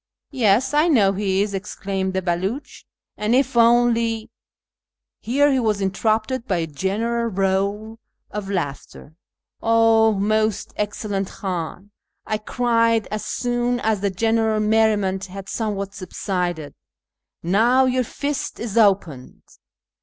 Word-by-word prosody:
" -, -, -66 dB
Yes, 255 Hz, 0 st, +2 dB
I 300 Hz, +3 st, +4 dB
know 210 Hz, -, +4 dB
he 195 Hz, 0 st, 0 dB
is," 205 Hz, -1 st, -4 dB
exclaimed 190 Hz, -1 st, -3 dB
the 190 Hz, -, -1 dB
Belucli, 190 Hz, +10 st, -3 dB, 0.2 s
" -, -, -62 dB
and 215 Hz, +3 st, +1 dB
if 265 Hz, -1 st, +1 dB
only 230 Hz, -1 st, +3 dB, 0.4 s
" -, -, -68 dB
Here 285 Hz, +5 st, +2 dB
he 265 Hz, -, +2 dB
was 215 Hz, -4 st, 0 dB
interrupted 220 Hz, +6 st, -1 dB
by 185 Hz, -, 0 dB
a 165 Hz, -, -1 dB
general 210 Hz, +10 st, -2 dB
roar 200 Hz, +3 st, -1 dB, 0.3 s
of 205 Hz, -2 st, -5 dB
laughter. 150 Hz, -4 st, -5 dB, 0.2 s
" -, -, -52 dB
0 225 Hz, -1 st, +4 dB
most 215 Hz, +1 st, 0 dB
excellent 205 Hz, -1 st, -2 dB
Khan," 185 Hz, +1 st, -5 dB, 0.3 s
I 215 Hz, -, -2 dB
cried, 230 Hz, 0 st, +1 dB
as 215 Hz, 0 st, -3 dB
soon 245 Hz, 0 st, -1 dB
as 220 Hz, -4 st, 0 dB
the 200 Hz, -, +1 dB
general 220 Hz, +2 st, +1 dB
merriment 210 Hz, -3 st, +1 dB
had 195 Hz, +1 st, -9 dB
somewhat 200 Hz, -3 st, -3 dB
subsided, 180 Hz, -4 st, -3 dB, 0.4 s
" -, -, -60 dB, 0.2 s
now 250 Hz, +3 st, +4 dB
your 255 Hz, 0 st, +1 dB
fist 290 Hz, +4 st, -4 dB
is 230 Hz, -1 st, -1 dB
opened 180 Hz, -, +1 dB
215 Hz, 140 wpm, -22 LUFS, 195-230 Hz, 0.4 s, I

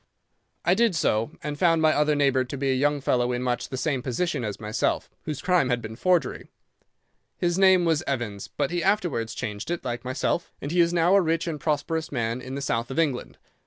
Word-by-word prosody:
"'I -, -, +5 dB
did 230 Hz, -6 st, +2 dB
so, 115 Hz, -7 st, +1 dB
and 145 Hz, -1 st, -4 dB
found 165 Hz, -2 st, +4 dB
my 155 Hz, -1 st, +4 dB
other 150 Hz, 0 st, +2 dB
neighbour 135 Hz, -3 st, +3 dB
to 130 Hz, +3 st, -6 dB
be 135 Hz, 0 st, 0 dB
a -, -, +3 dB
young 145 Hz, +2 st, +1 dB
fellow 125 Hz, -2 st, +1 dB
in 125 Hz, 0 st, -2 dB
much 125 Hz, -1 st, -1 dB
the 130 Hz, -, -4 dB
same 135 Hz, -1 st, -1 dB
position 130 Hz, +3 st, -1 dB
as 105 Hz, -3 st, -4 dB
myself, 110 Hz, +2 st, -1 dB
whose 150 Hz, -3 st, -4 dB
crime 180 Hz, -8 st, +3 dB
had 125 Hz, -1 st, +1 dB
been 110 Hz, -1 st, -7 dB
forgery. 180 Hz, +6 st, 0 dB, 0.9 s
His 175 Hz, -1 st, 0 dB
name 190 Hz, -2 st, +5 dB
was 160 Hz, -2 st, +2 dB
Evans, 115 Hz, -7 st, -3 dB
but 145 Hz, +1 st, -2 dB
he 175 Hz, -1 st, -1 dB
afterwards 165 Hz, -, 0 dB
changed 105 Hz, -1 st, -5 dB
it, 175 Hz, -5 st, -3 dB
like 120 Hz, -1 st, -3 dB
myself, 130 Hz, +6 st, -1 dB
and 145 Hz, -, -5 dB
he 175 Hz, -, +1 dB
is 170 Hz, 0 st, +3 dB
now 175 Hz, +1 st, +3 dB
a 200 Hz, -, +6 dB
rich 165 Hz, 0 st, 0 dB
and 160 Hz, -3 st, -3 dB
prosperous 155 Hz, +2 st, -1 dB
man 120 Hz, -2 st, -2 dB
in 130 Hz, +1 st, -6 dB
the 140 Hz, -, -4 dB
south 115 Hz, -3 st, -1 dB
of 130 Hz, -, -6 dB
England. 145 Hz, -7 st, -1 dB
145 Hz, 220 wpm, -25 LUFS, 125-165 Hz, 0.9 s, a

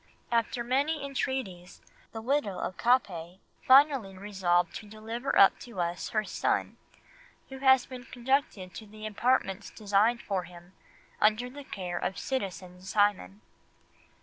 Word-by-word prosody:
"After 235 Hz, +1 st, 0 dB
many 280 Hz, +4 st, 0 dB
entreaties 255 Hz, -10 st, -4 dB, 0.3 s
the 225 Hz, -1 st, -7 dB
widow 255 Hz, -6 st, 0 dB
of 185 Hz, -, -4 dB
Capet 185 Hz, -8 st, +1 dB, 0.2 s
finally 260 Hz, -8 st, +5 dB
resolved 185 Hz, -3 st, +1 dB
to 210 Hz, -, -11 dB
deliver 225 Hz, +5 st, -3 dB
up 195 Hz, -, +7 dB
to 235 Hz, -6 st, -9 dB
us 175 Hz, 0 st, -2 dB
her 215 Hz, -1 st, 0 dB
son, 185 Hz, -, -1 dB, 0.7 s
who 265 Hz, 0 st, -8 dB
has 265 Hz, -1 st, +5 dB
been 255 Hz, -1 st, -9 dB
conducted 245 Hz, -8 st, -1 dB
to 220 Hz, -, -9 dB
the 215 Hz, +1 st, -10 dB
apartments 215 Hz, -2 st, 0 dB
designed 215 Hz, +3 st, +1 dB
for 190 Hz, -3 st, -2 dB
him 175 Hz, +1 st, -14 dB, 0.5 s
under 220 Hz, +4 st, +2 dB
the 285 Hz, +2 st, -9 dB
care 180 Hz, -8 st, -5 dB
of 190 Hz, -, -3 dB
citizen 185 Hz, -7 st, -4 dB
Simon." 190 Hz, -, 0 dB
215 Hz, 135 wpm, -29 LUFS, 185-255 Hz, 0.7 s, up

